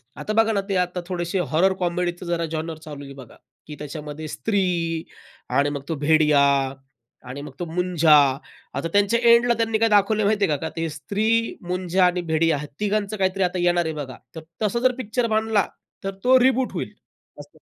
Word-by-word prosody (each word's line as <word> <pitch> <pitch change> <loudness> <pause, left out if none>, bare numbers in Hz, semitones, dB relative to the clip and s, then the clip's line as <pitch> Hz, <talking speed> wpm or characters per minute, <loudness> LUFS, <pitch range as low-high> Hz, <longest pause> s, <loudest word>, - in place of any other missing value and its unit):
आता 215 - -4
बघा 225 0 0
ना 200 - +1
ते 195 - 0
आता 180 0 -6
थोडेसे 175 0 -2
हॉरर 190 +4 +4
कॉमेडीच 175 0 -2
जरा 170 -1 -1
जॉनर 160 0 -4
चालू 145 -2 -8
आहे 140 - -10
बघा, 130 -4 -13 0.3
की 150 - -8
त्याच्यामध्ये 150 +1 -7
स्त्री 200 +5 -1 0.9
आणि 140 +1 +2
मग 145 -1 -4
तो 160 - -1
भेडिया 150 -2 +4 0.9
आणि 130 +3 -6
मग 145 - -8
तो 175 - -2
मुंजा, 170 -2 +3 0.6
आता - - -2
त्यांच्या 205 +3 +3
एंडला 235 +1 +5
त्यांनी 225 -1 +1
काय 225 +1 +2
दाखवलंय 210 +1 +3
माहिती 205 0 +2
आहे 150 - +1
का 160 - -3
ते 165 -1 -2
स्त्री 180 +8 -4 0.4
मुंझा 180 0 +1
आणि 180 0 +1
भेडिया 165 -2 +1
या - - -5
तिघांचं 210 0 -1
काहीतरी 190 0 +1
आता 180 0 -1
येणार 175 -1 +2
आहे 160 - -2
बघा. 140 -4 -7 0.2
तर 160 - -6 0.2
तसं 215 +2 0
जर 255 +1 +3
पिक्चर 235 0 -1
बनला, 220 -2 +1 0.4
तर 195 - -2
तो 255 +1 +6
रिबूट 260 0 +2
होईल - - -4 0.5
असं. - - -13
180 Hz, 185 wpm, -23 LUFS, 160-210 Hz, 0.9 s, तो